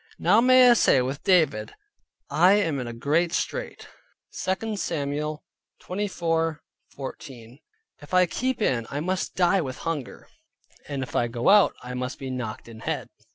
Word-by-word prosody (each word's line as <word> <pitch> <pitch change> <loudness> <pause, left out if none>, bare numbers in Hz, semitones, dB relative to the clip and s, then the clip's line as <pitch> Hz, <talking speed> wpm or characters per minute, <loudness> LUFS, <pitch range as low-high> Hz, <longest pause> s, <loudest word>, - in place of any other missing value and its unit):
Now 205 +6 +4
may 255 0 +7
I 245 - +8
say 205 - +4
with 135 +3 -4
David, 155 - +2 0.5
"I 175 +7 +4
am 165 -9 +1
in 125 - -4
a - - -5
great 150 +8 0
strait" - - -3 0.5
(2 210 +4 -2
Samuel 150 -4 -3 0.4
24.14). 160 - -4 0.4
If 145 - -14
I 185 0 +5
keep 250 +6 -2
in, 115 - 0
I 145 - -3
must 185 +4 -2
die 185 +1 +3
with 130 -4 -5
hunger, 150 -6 -4 0.6
and 140 -2 -3
if 130 - -9
I 120 - +2
go 120 +4 0
out, 205 -1 +6
I 125 0 -6
must 125 +1 -4
be 135 -1 -6
knocked 120 -4 -5
in 115 -1 -11
head. - - -4
155 Hz, 155 wpm, -25 LUFS, 130-185 Hz, 0.6 s, I